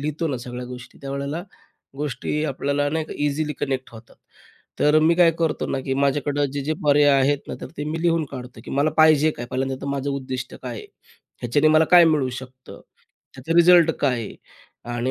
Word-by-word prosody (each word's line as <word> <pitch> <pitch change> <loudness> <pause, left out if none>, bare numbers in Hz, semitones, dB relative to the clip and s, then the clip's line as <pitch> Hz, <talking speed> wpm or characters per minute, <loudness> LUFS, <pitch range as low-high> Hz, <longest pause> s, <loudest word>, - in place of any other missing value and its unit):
लिहितो 155 +3 -2
ना 135 - -2
सगळ्या 125 +1 -7
गोष्टी, 125 0 -11
त्यावेळेला 140 +4 -4 0.5
गोष्टी 150 +2 -3
आपल्याला 140 0 -1
नाही 160 +1 -1
का - - -9
इझिली 150 +1 -1
कनेक्ट 130 -2 -3
होतात. 115 +1 -14 0.6
तर 150 +1 +4
मी 160 +2 +4
काय 170 -1 +5
करतो 165 -2 -1
ना 135 - -1
की 135 - -1
माझ्याकडं 140 +1 0
जे 140 - -3
जे 155 - 0
पर्याय 145 0 +5
आहेत 140 +2 +2
ना, - - -4
तर - - -6
ते 145 - -4
मी 160 +2 -4
लिहून 165 -2 +2
काढतो 125 -2 -9
की - - -9
मला 140 +3 +1
पाहिजे 155 -1 +5
काय 120 - -6
पहिल्यांदा? 130 +1 -2
तर 140 - -6
माझं 140 0 -2
उद्दिष्ट 130 -2 -5
काय 125 -2 -5
आहे? - - -10 0.6
ह्याच्याने 145 +6 +2
मला 155 +1 +5
काय 175 -1 +8
मिळू 150 -5 +2
शकतं? 130 0 -12 0.5
त्याचं 135 +5 -4
रिझल्ट 170 -1 +6
काय 135 -3 +2
आहे? 110 - -7 0.6
आणि 120 +2 -1
145 Hz, 195 wpm, -22 LUFS, 130-155 Hz, 0.6 s, काय